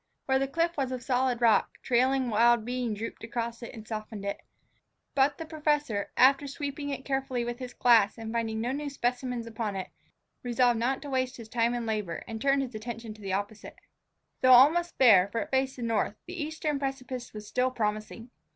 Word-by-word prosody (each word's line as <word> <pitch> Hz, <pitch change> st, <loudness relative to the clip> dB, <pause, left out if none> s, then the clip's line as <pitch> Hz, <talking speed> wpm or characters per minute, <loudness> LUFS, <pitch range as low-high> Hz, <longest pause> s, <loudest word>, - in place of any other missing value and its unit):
Where 265 Hz, 0 st, +2 dB
the 270 Hz, -, 0 dB
cliff 335 Hz, +4 st, 0 dB
was 265 Hz, -2 st, -1 dB
of 255 Hz, -2 st, -4 dB
solid 250 Hz, -1 st, +1 dB
rock, 230 Hz, -2 st, +3 dB
trailing 255 Hz, 0 st, +2 dB
wild 235 Hz, +1 st, +4 dB
bean 245 Hz, -2 st, -2 dB
drooped 225 Hz, +2 st, -6 dB
across 235 Hz, 0 st, -4 dB
and 225 Hz, -2 st, -9 dB
softened 215 Hz, -2 st, -6 dB
it. 200 Hz, -, -3 dB, 0.7 s
But 275 Hz, +1 st, +3 dB
the 325 Hz, -, -6 dB
professor, 295 Hz, -9 st, -1 dB
after 275 Hz, +2 st, +5 dB
sweeping 285 Hz, +1 st, -5 dB
it 270 Hz, -1 st, -5 dB
carefully 270 Hz, -3 st, -1 dB
with 240 Hz, +1 st, -4 dB
his 250 Hz, -1 st, -7 dB
glass 225 Hz, -4 st, +4 dB
and 225 Hz, 0 st, -6 dB
finding 225 Hz, -1 st, -1 dB
no 240 Hz, +3 st, -1 dB
new 290 Hz, +2 st, -3 dB
specimens 245 Hz, -2 st, -2 dB
upon 220 Hz, -3 st, -4 dB
it, 190 Hz, -, -4 dB, 0.5 s
resolved 245 Hz, -1 st, +2 dB
not 260 Hz, +4 st, 0 dB
to 290 Hz, -, -7 dB
waste 255 Hz, -1 st, -1 dB
his 230 Hz, -2 st, -10 dB
time 235 Hz, +1 st, +1 dB
and 240 Hz, -1 st, -3 dB
labor, 210 Hz, -7 st, -3 dB
and 220 Hz, -1 st, -6 dB
turned 275 Hz, +1 st, +3 dB
his 255 Hz, -2 st, -7 dB
attention 225 Hz, 0 st, -6 dB, 0.2 s
opposite. 205 Hz, +2 st, -4 dB, 0.7 s
Though 255 Hz, 0 st, +7 dB
almost 320 Hz, +7 st, +5 dB
bare, 205 Hz, -8 st, +7 dB
for 230 Hz, +3 st, -3 dB
it -, -, -6 dB
faced 265 Hz, 0 st, +1 dB
the 245 Hz, -, -6 dB
north, 225 Hz, -2 st, 0 dB
the 355 Hz, -1 st, -6 dB
eastern 300 Hz, -1 st, -2 dB
precipice 260 Hz, -3 st, -4 dB
still 220 Hz, +4 st, -2 dB
was 255 Hz, -, -17 dB
promising. 215 Hz, +2 st, -3 dB
245 Hz, 190 wpm, -28 LUFS, 225-270 Hz, 0.7 s, Though